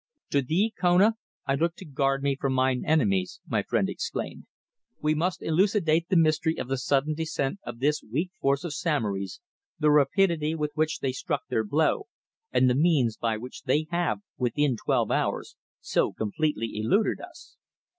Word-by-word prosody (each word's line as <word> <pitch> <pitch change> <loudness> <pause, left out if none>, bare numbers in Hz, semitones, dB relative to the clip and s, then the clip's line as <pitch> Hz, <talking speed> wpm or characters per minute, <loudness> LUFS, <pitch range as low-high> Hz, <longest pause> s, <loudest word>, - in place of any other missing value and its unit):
"To 140 - +3
thee, 185 - +1
Kona, 185 +5 +5 0.3
I 135 - +1
look 165 +4 0
to 190 - -11
guard 135 -2 0
me 140 -1 +1
from 135 0 -1
mine 130 -1 +1
enemies," 105 - +1
my - - +1
friend - - 0
exclaimed. - - -5 0.5
"We 150 0 +1
must 170 +4 -1
elucidate 170 -1 +2
the 190 - +2
mystery 160 0 +2
of - - -4
the 135 - 0
sudden 140 +4 +1
descent 155 +1 -2
of - - -7
this 145 +4 +1
weak 155 - -3
force 140 0 +1
of 170 -4 -4
Samory's, 105 - -2 0.4
the 150 0 +3
rapidity 155 +2 +3
with 150 -2 -2
which 155 0 -1
they 135 - 0
struck 145 +3 -3
their 110 -3 +1
blow, 150 - +1 0.4
and 130 - +4
the 125 - +4
means 140 -6 +3
by 115 -2 -1
which 125 +3 -9
they 150 +4 +2
have, 175 +3 0 0.2
within 130 +2 +1
twelve - - 0
hours, - - -1 0.3
so - - +1
completely 115 0 -2
eluded 115 - +1
us." - - -13
150 Hz, 170 wpm, -27 LUFS, 130-165 Hz, 0.5 s, Kona